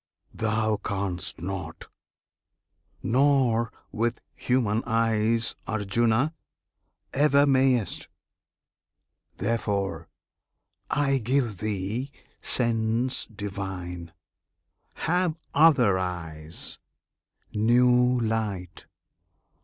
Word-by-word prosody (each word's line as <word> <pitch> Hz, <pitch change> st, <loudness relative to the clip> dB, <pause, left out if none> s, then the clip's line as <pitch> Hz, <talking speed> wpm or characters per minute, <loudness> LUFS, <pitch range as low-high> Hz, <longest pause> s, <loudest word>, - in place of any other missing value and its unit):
Thou 110 Hz, -1 st, 0 dB
canst 95 Hz, -4 st, -3 dB
not! 95 Hz, +3 st, -6 dB, 1.2 s
nor, 125 Hz, -3 st, +3 dB, 0.2 s
with 115 Hz, +2 st, -1 dB
human 115 Hz, -4 st, +1 dB
eyes, 115 Hz, 0 st, +1 dB
Arjuna! 115 Hz, +7 st, +1 dB, 0.8 s
ever 145 Hz, 0 st, +4 dB
mayest! 130 Hz, -5 st, +2 dB, 1.3 s
Therefore 100 Hz, -5 st, -1 dB, 0.8 s
I 140 Hz, -2 st, +2 dB
give 120 Hz, -3 st, 0 dB
thee 105 Hz, +5 st, -2 dB, 0.3 s
sense 115 Hz, +1 st, 0 dB
divine. 95 Hz, -5 st, -6 dB, 0.8 s
Have 175 Hz, -1 st, 0 dB, 0.2 s
other 130 Hz, -11 st, +5 dB
eyes, 80 Hz, -3 st, -4 dB, 0.7 s
new 125 Hz, +3 st, +4 dB
light! 105 Hz, -6 st, -3 dB
110 Hz, 65 wpm, -26 LUFS, 100-125 Hz, 1.3 s, other